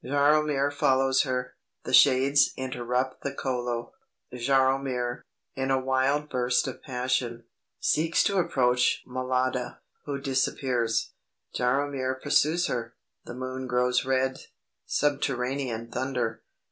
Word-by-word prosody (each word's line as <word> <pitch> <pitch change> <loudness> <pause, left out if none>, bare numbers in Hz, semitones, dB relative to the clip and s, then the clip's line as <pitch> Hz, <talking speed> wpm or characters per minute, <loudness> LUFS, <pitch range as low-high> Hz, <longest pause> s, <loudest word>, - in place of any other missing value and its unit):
Jaromir 145 +1 +2
follows 135 -1 +3
her. 125 0 -2 0.3
The - - -5
shades 140 +1 +5
interrupt 125 0 -2
the 140 - -3
Kolo. 120 - -3 0.4
Jaromir, 130 -1 +1 0.3
in 135 -1 -2
a 135 0 +3
wild 135 +3 +1
burst 125 -3 +1
of - - -6
passion, 125 -3 -2 0.4
seeks 160 +2 +2
to 200 -1 +1
approach 125 -6 +2
Mlada, 130 0 -1 0.3
who 140 -1 -3
disappears. 130 -3 0 0.4
Jaromir 130 0 0
pursues 165 +6 +2
her. 120 -1 -3 0.3
The 120 - -8
moon 130 0 -5
grows 125 0 +1
red. 130 0 -1 0.4
Subterranean 130 -4 -1
thunder. 125 -3 -2
130 Hz, 110 wpm, -27 LUFS, 125-135 Hz, 0.4 s, shades